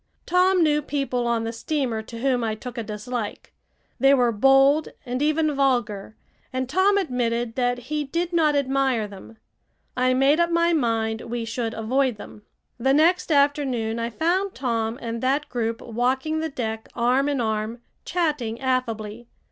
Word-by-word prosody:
Tom 365 0 +3
knew 300 -1 +2
people 275 -4 -2
on 235 -1 0
the 225 0 -3
steamer 245 -2 -2
to 230 +1 -9
whom 255 -2 +1
I 220 -1 -1
took 245 +3 -8
a 235 - -3
dislike. 215 +1 -5 0.5
They 270 +2 +6
were 245 -3 +3
bold 270 +6 +4 0.2
and 250 +1 -3
even 310 0 +2
vulgar, 240 -7 0 0.4
and 260 -1 -2
Tom 380 +8 +3
admitted 240 - -1
that 245 0 0
he 295 +5 -3
did 340 +5 -3
not 310 -3 +3
admire 265 -5 +1
them. 205 +3 -12 0.6
I 255 0 +2
made 275 +4 +4
up 340 0 +3
my 340 0 +2
mind 225 -6 0
we 235 0 -4
should 230 0 -3
avoid 255 +3 +1
them. 210 - -11 0.4
The 265 +3 +3
next 335 +3 +3
afternoon 280 -6 +1
I 230 0 -2
found 360 - 0
Tom 230 -3 -1
and 230 0 -4
that 275 +3 0
group 230 -2 -2
walking 260 +7 -1
the 320 0 -2
deck 225 -5 -4
arm 255 +4 +2
in 285 -2 -1
arm, 220 0 -2 0.2
chatting 295 -10 -1
affably. 235 -3 -2
255 Hz, 165 wpm, -24 LUFS, 230-290 Hz, 0.6 s, They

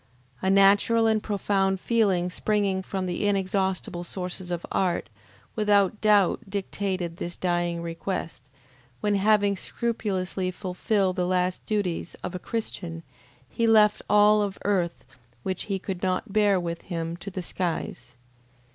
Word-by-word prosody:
A 190 - +1
natural 200 +4 +5
and 220 -1 +3
profound 195 -2 0
feeling 190 -6 +1
springing 200 -1 0
from 190 0 -3
the 180 +3 -1
inexhaustible 190 -2 -1
sources 180 0 -5
of 175 -1 -3
art, 180 -3 0 0.5
without 205 -2 +2
doubt 205 -4 +4
dictated 190 -3 -3
this 175 0 -5
dying 175 -1 -1
request, 165 -2 -4 0.6
when 210 - +1
having 205 0 +3
scrupulously 195 -4 -2
fulfilled 185 +1 -1
the 180 -1 +1
last 180 0 0
duties 195 -6 -2
of - - -4
a 180 - -4
Christian, 175 -6 -5 0.4
he 230 - 0
left 215 -2 +5
all 210 0 +6
of 200 -1 -2
earth 185 -4 0 0.4
which 185 -1 -3
he 195 -2 -1
could 190 -1 -5
not 190 +2 -1
bear 205 -3 +4
with 170 -1 -4
him 165 -2 -4
to 180 +3 -7
the 185 -1 -5
skies. 145 -9 -4
190 Hz, 140 wpm, -26 LUFS, 180-205 Hz, 0.6 s, all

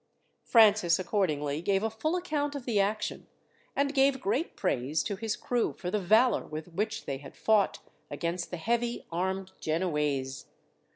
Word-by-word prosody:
Francis 210 -7 +5
accordingly 155 -7 -1
gave 195 +3 +1
a 225 - +1
full 310 +10 -1
account 300 -5 -1
of 275 -4 -6
the 225 -5 +1
action, 210 +2 -1 0.5
and 280 0 +1
gave 270 -1 +3
great 260 - -1
praise 150 -4 0
to 200 - -2
his 220 +2 -2
crew 245 -1 -1
for 180 -1 -5
the 210 - +1
valour 220 +5 +3
with 155 +2 -6
which 215 +5 -3
they 135 -1 -3
had 135 -1 -12
fought 215 -3 +3 0.3
against 170 +1 -3
the 175 - -4
heavy 235 +6 -1
armed 190 +2 -2
Genoese. 150 -5 -1
200 Hz, 160 wpm, -29 LUFS, 165-235 Hz, 0.5 s, Francis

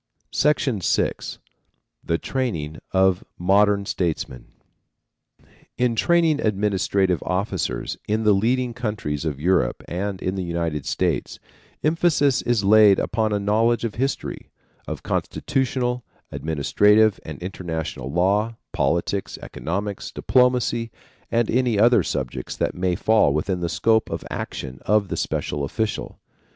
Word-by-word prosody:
VI. 150 +1 +4 1.5
THE 85 - 0
TRAINING 85 - -3
OF 95 -1 +3
MODERN 100 +2 +3
STATESMEN. 80 -9 -3 1.3
In 125 -2 +1
training 165 +3 +3
administrative 100 -3 +1
officers 90 - -2
in 110 +1 0
the 105 -1 +5
leading 120 +5 +1
countries 105 - -3
of 75 -4 -2
Europe 85 -7 +1
and 95 +2 -3
in 95 - -2
the 95 -1 -3
United 85 -4 -2
States, - - -1 0.5
emphasis 155 -4 +2
is 120 -4 +1
laid 105 -1 +6
upon 110 -1 0
a 105 - +1
knowledge 110 +4 +2
of 115 -3 -2
history, 135 +3 -3 0.4
of - - -5
constitutional, 125 -3 -1 0.3
administrative 105 +7 +3
and 75 -3 -7
international 80 -7 -4
law, 100 +7 +1 0.2
politics, 95 +3 -1
economics, 100 +4 -4
diplomacy 125 -2 +2 0.4
and 115 -1 +1
any 125 -2 +2
other 120 +4 +5
subjects 65 -2 -4
that - - 0
may 90 0 0
fall 110 -6 +3
within 90 +4 -1
the 85 -1 -2
scope 110 +4 +2
of - - -4
action 65 -2 -5
of 105 -2 +2
the - - -2
special 75 -1 -2
official. 110 +9 -3
100 Hz, 120 wpm, -23 LUFS, 90-115 Hz, 1.5 s, laid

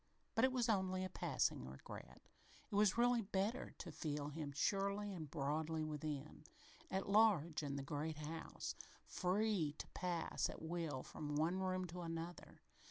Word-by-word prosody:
But 225 - +5
it 260 - +3
was 250 -2 +2
only 190 -3 +2
a - - -3
passing 140 - +1
regret. 65 0 -9 0.5
It - - -7
was 205 +1 +5
really 240 0 +5
better 200 +4 -1
to 170 - -6
feel 145 -1 -2
him 150 -1 -4
surely 200 +6 +1
and 160 -5 -5
broadly 155 +2 0
within 150 -1 -4 0.5
at 190 - -1
large 200 -7 +5
in 140 -2 -2
the 140 - -2
great 150 +2 -2
house, 155 +2 -4 0.3
free 185 -4 +2
to - - -5
pass 175 -3 0
at - - -6
will 160 -5 -2
from 150 -1 -4
one 165 +5 +2
room 185 -1 0
to 180 +1 -6
another. 165 +1 -5
170 Hz, 160 wpm, -41 LUFS, 150-195 Hz, 0.5 s, But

